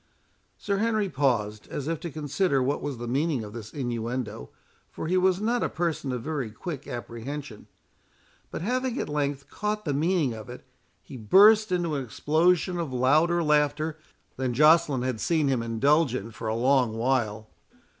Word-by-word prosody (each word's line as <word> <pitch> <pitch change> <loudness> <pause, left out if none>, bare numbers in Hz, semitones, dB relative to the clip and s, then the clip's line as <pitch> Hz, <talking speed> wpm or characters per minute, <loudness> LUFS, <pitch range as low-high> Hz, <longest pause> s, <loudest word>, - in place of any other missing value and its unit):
Sir 200 -1 -2
Henry 215 -2 +1
paused, 115 - 0
as 145 - -5
if 165 -2 -2
to 170 - -5
consider 145 -1 0
what 140 +3 -1
was 140 -4 -4
the 120 +1 -6
meaning 140 0 0
of 105 0 -9
this 110 -3 -8
innuendo; 120 - -4 0.4
for - - -6
he 175 +3 0
was 185 0 +3
not 235 +3 0
a - - 0
person 165 -5 -2
of 125 -2 -4
very 145 -6 -3
quick 145 +5 -7
apprehension. 120 +1 -7 0.8
But - - -5
having 255 +3 -1
at - - -2
length 145 -2 -2
caught 210 0 -3
the 145 - 0
meaning 155 -3 +1
of 110 -1 -9
it, - - -10 0.4
he 130 - -10
burst 205 - +6
into 175 -3 0
an 140 -2 -1
explosion 170 - +1
of 165 -5 -3
louder 155 +7 +3
laughter 150 +1 +1 0.4
than 130 -2 -2
Joceline 150 -2 +4
had 130 -3 -2
seen 160 -4 +1
him 130 -3 +1
indulge 130 +5 +2
in 115 -1 -5
for 115 - -7
a 110 - 0
long 125 -2 +2
while. 115 -3 0
145 Hz, 175 wpm, -26 LUFS, 120-170 Hz, 0.8 s, burst